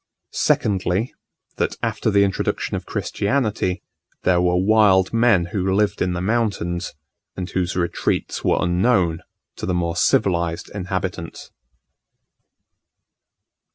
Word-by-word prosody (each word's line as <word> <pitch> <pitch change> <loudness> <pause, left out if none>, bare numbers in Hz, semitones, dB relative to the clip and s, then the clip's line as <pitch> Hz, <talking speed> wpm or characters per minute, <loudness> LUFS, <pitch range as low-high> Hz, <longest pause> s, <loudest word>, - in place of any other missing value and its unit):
Secondly, 100 +3 0 0.4
that - - -1
after - - 0
the 100 -1 +4
introduction 95 -1 -1
of - - -5
Christianity, 105 -5 -1 0.4
there 90 -1 +3
were 90 0 +2
wild 95 -1 +4
men 115 -7 +3
who 95 -1 0
lived 100 +1 +1
in 90 -1 +1
the 90 - -3
mountains, 95 -6 -1 0.4
and 90 -1 -3
whose 90 -2 -1
retreats 85 -2 -1
were - - +2
unknown 90 -2 +2 0.4
to - - -5
the 90 - 0
more 85 -1 -1
civilized 85 -2 +1
inhabitants. 95 -3 -5
95 Hz, 115 wpm, -21 LUFS, 90-100 Hz, 0.4 s, the